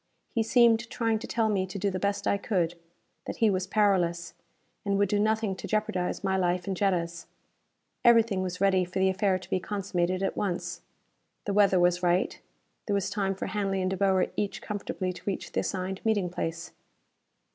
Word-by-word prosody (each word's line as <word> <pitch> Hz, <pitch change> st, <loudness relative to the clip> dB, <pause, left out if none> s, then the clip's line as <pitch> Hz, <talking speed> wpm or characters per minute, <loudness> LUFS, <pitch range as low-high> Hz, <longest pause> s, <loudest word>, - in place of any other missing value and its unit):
He 230 Hz, -, +2 dB
seemed 230 Hz, 0 st, +4 dB
trying 225 Hz, -2 st, 0 dB
to -, -, -7 dB
tell 225 Hz, -2 st, +1 dB
me 195 Hz, -3 st, 0 dB
to 185 Hz, -, -6 dB
do 200 Hz, +1 st, 0 dB
the 185 Hz, -, -3 dB
best 200 Hz, +1 st, -1 dB
I 200 Hz, -, +2 dB
could; 180 Hz, -6 st, 0 dB, 0.5 s
that -, -, -4 dB
he 225 Hz, -2 st, +3 dB
was 185 Hz, -1 st, -1 dB
powerless, 175 Hz, -5 st, +1 dB, 0.5 s
and 200 Hz, -1 st, 0 dB
would 200 Hz, -1 st, +2 dB
do 205 Hz, -, +1 dB
nothing 215 Hz, -1 st, +1 dB
to -, -, -7 dB
jeopardize 205 Hz, -4 st, -1 dB
my 190 Hz, -1 st, +1 dB
life 180 Hz, -1 st, 0 dB
and 195 Hz, -, -2 dB
Jetta's. 170 Hz, -4 st, -1 dB, 0.8 s
Everything 230 Hz, -5 st, +5 dB
was 180 Hz, -1 st, -4 dB
ready 190 Hz, -1 st, +3 dB
for 180 Hz, +2 st, -6 dB
the 190 Hz, 0 st, +3 dB
affair 190 Hz, 0 st, +1 dB
to 185 Hz, -, -13 dB
be 185 Hz, -, +2 dB
consummated 185 Hz, -2 st, -1 dB
at 195 Hz, -, -1 dB
once. 175 Hz, -3 st, -3 dB, 0.6 s
The 200 Hz, -, -1 dB
weather 200 Hz, -2 st, +4 dB
was 175 Hz, 0 st, +3 dB
right; 180 Hz, +1 st, +1 dB, 0.5 s
there 205 Hz, -, +1 dB
was 200 Hz, -, -1 dB
time 195 Hz, -2 st, -1 dB
for -, -, -4 dB
Hanley 195 Hz, -2 st, -1 dB
and 185 Hz, 0 st, 0 dB
De -, -, 0 dB
Boer 190 Hz, -1 st, +3 dB
each 200 Hz, -1 st, -2 dB
comfortably 195 Hz, -3 st, -4 dB
to -, -, -11 dB
reach 195 Hz, -, -3 dB
the -, -, 0 dB
assigned 190 Hz, 0 st, -3 dB
meeting 205 Hz, -5 st, +1 dB
place. 165 Hz, -1 st, -4 dB
195 Hz, 195 wpm, -28 LUFS, 180-205 Hz, 0.8 s, Everything